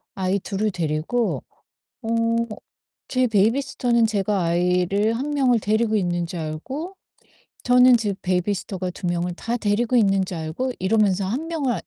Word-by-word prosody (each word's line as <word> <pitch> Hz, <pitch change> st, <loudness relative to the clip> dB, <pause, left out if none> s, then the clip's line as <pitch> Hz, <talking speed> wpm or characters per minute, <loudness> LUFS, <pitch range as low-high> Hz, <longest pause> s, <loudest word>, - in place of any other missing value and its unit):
아이 190 Hz, +1 st, 0 dB
둘을 205 Hz, +3 st, -2 dB
데리고 170 Hz, +7 st, -1 dB, 0.6 s
어 225 Hz, -, -6 dB, 1.0 s
제 255 Hz, -1 st, +2 dB
베이비시터는 235 Hz, +2 st, +2 dB
제가 205 Hz, -2 st, 0 dB
아이를 180 Hz, +5 st, +1 dB
1 275 Hz, +5 st, -3 dB
명을 260 Hz, -5 st, +2 dB
데리고 220 Hz, +1 st, +1 dB
있는 175 Hz, -3 st, 0 dB
줄 170 Hz, 0 st, -6 dB
알고 260 Hz, -, -5 dB, 0.7 s
저는 250 Hz, 0 st, +6 dB
지 210 Hz, -3 st, -1 dB
베이비시터가 185 Hz, 0 st, -1 dB
2 180 Hz, -, -6 dB
명을 175 Hz, 0 st, -1 dB
다 235 Hz, +6 st, -3 dB
데리고 220 Hz, +3 st, 0 dB
있는 195 Hz, -4 st, +3 dB
줄 180 Hz, -2 st, -6 dB
알고 160 Hz, +12 st, -3 dB
이러면서 195 Hz, -1 st, +2 dB
1 255 Hz, +11 st, -2 dB
명을 285 Hz, -8 st, -1 dB
205 Hz, 285 characters per minute, -23 LUFS, 180-240 Hz, 1.0 s, 저는